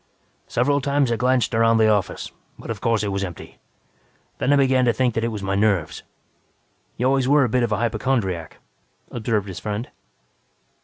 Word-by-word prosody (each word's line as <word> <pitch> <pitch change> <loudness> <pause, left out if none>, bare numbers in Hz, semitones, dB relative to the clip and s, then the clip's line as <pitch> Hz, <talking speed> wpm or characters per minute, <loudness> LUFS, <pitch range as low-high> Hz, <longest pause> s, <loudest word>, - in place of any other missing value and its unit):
"Several 140 +4 +1
times 140 -2 +1
I - - +2
glanced 125 +1 +1
around 115 0 +3
the 110 -1 +4
office, 105 -3 -1 0.3
but - - -7
of - - -6
course 115 -2 +1
it 105 - -1
was 100 0 -2
empty. 90 -4 -8 0.8
Then 135 - +1
I - - +6
began 130 -2 +3
to 120 - +3
think 125 -1 +1
that 115 - -1
it - - +1
was 105 -3 -5
my 95 0 -1
nerves." 100 -6 0 1.0
"You 125 - -1
always 135 -1 +2
were 145 +1 +5
a 125 - 0
bit 125 +2 +1
of 120 -2 0
a 105 - +1
hypochondriac," 110 -7 -1 0.5
observed 110 -3 -1
his 95 -2 -7
friend. 105 +3 -5
115 Hz, 190 wpm, -22 LUFS, 105-130 Hz, 1.0 s, I